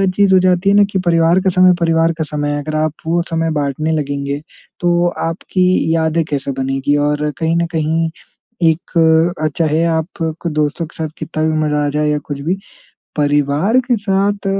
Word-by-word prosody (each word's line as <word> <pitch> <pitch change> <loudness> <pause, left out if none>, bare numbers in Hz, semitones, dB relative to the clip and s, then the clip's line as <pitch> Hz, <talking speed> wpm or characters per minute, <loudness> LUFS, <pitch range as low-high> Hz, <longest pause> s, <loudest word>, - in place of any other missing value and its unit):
चीज़ 200 -1 +3
हो 185 - +6
जाती 185 +1 +2
है 200 - +4
ना 205 - +6
कि 190 - 0
परिवार 165 +1 +3
का 190 - +2
समय 185 0 +6
परिवार 165 0 +2
का 160 - -1
समय 145 -1 -3
है। 145 - -1
अगर 155 +1 -5
आप 155 -1 0
वो 170 +1 +2
समय 165 0 -1
बाँटने 145 +3 -1
लगेंगे, 140 -1 -2 0.4
तो 175 0 +2 0.2
आपकी 180 +2 -1 0.3
यादें 160 0 +1
कैसे 140 -1 -2
बनेंगी? 135 +2 0
और 150 +1 0
कहीं 165 +1 +1
ना 170 - +1
कहीं 160 0 0 0.6
एक 165 +1 +2
अ, - - +3
चाहे 160 0 +1
आप 160 -1 0 0.4
क - - -1
दोस्तों 150 +2 -1
के - - -20
साथ 155 - -3
कितना 155 - -3
भी 160 0 +1
मज़ा 150 0 0
आ - - 0
जाए 150 +1 0
या 150 - +1
कुछ 145 -2 -5
भी, 175 +6 0 0.6
परिवार 145 - +2
के 240 - +4
साथ 200 0 -1
160 Hz, 195 wpm, -16 LUFS, 150-175 Hz, 0.6 s, हो